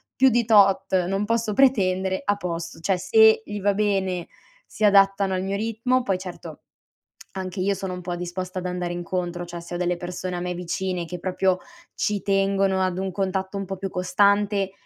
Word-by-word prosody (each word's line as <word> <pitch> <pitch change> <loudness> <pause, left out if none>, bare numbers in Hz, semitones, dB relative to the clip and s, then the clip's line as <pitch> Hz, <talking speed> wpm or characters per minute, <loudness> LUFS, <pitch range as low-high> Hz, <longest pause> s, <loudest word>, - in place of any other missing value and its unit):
più 265 +1 +5
di 240 0 +2
tot 195 -3 +4
non 195 +3 -1
posso 230 -1 0
pretendere, 190 -7 +2
a 205 +2 +1
posto." 170 -3 -5
Cioè 185 +3 0
se 220 +5 +5
gli 205 0 -5
va 205 +1 +2
bene 195 -4 0 0.4
si - - -6
adattano 195 -1 +4
al 185 0 -1
mio 195 +1 -2
ritmo; 230 +4 0
poi 195 -5 0
certo 185 -1 -9 0.7
anche 185 0 -5
io 195 +2 +1
sono 190 -1 -5
un 180 - -6
po' 175 0 -4
disposta 180 +1 -5
ad 185 - -7
andare 180 -1 -3
incontro, 175 0 -3
cioè 175 0 -7
se 170 +1 -8
ho - - -2
delle 180 0 0
persone 180 +1 -5
a - - -3
me 180 0 -3
vicine 180 0 -3
che 180 +1 -7
proprio 185 +1 +1 0.4
ci 205 -2 -1
tengono 195 0 +1
ad 185 -1 -1
un 190 0 -2
contatto 190 +1 -2
un 195 - -3
po' 195 0 -5
più 195 +1 -4
costante, 200 +2 +2
190 Hz, 195 wpm, -24 LUFS, 180-200 Hz, 0.7 s, più